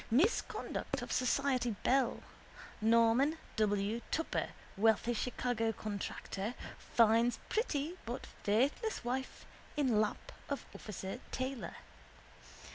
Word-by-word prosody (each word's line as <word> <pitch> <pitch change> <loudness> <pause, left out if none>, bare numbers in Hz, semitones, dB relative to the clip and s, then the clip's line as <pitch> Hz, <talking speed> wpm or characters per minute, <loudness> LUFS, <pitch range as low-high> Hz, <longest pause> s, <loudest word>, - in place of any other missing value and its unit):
Misconduct 310 - +1
of - - -6
society 255 -3 +2
belle. 260 -1 +2 0.6
Norman 230 +7 +4 0.2
W. 210 +1 +1
Tupper, 325 - 0 0.3
wealthy 220 +3 +3
Chicago 235 -1 0
contractor, 205 +1 -4 0.2
finds 230 +1 +4
pretty 335 - 0
but 240 +2 -4 0.2
faithless 265 - +1
wife 260 +2 -3 0.3
in 250 -7 +4
lap 215 - -2 0.2
of 280 - -2
officer 195 -2 -6
Taylor. 260 -1 -3
240 Hz, 95 wpm, -35 LUFS, 220-270 Hz, 0.6 s, Norman